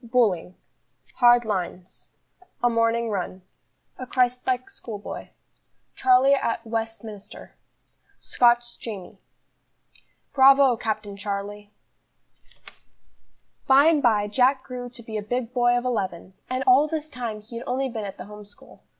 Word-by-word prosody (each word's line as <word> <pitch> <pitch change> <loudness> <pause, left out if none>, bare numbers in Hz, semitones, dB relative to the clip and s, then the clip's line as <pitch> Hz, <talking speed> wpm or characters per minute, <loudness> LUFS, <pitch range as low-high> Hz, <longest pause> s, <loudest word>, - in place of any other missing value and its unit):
Bullying. 220 -7 +1 0.6
Hard 240 -1 +5
lines. 185 -3 -5 0.5
A 240 - +4
morning 230 0 +1
run. 185 -1 -4 0.6
A 255 - -6
Christ 250 0 0
like 255 -1 0
schoolboy. 235 - -8 0.7
Charlie 260 +2 +4
at 230 -4 -1
Westminster. 225 -2 -6 0.7
Scotch 240 -1 +2
Jamie. 205 -6 -8 1.1
"Bravo, 270 -1 +6
Captain 215 -3 -4
Charlie!" 205 +1 -5 2.0
BY 275 +2 +6
and 320 -2 +4
by 215 -5 +3
Jack 260 +5 +2
grew 245 -1 -7
to 240 -1 -12
be 220 -1 -5
a - - -3
big 245 +3 -3
boy 245 -1 +3
of 245 - -3
eleven, 190 -7 -3 0.2
and 255 +1 -1
all 265 +4 +5
this 310 0 -4
time 240 -6 -5
he 225 +2 -10
had 235 - -8
only 265 +2 -1
been 230 -4 -5
at 195 -1 -7
the 180 - -8
home 210 +1 -11
school. 205 0 -15
235 Hz, 135 wpm, -24 LUFS, 210-255 Hz, 2.0 s, Bravo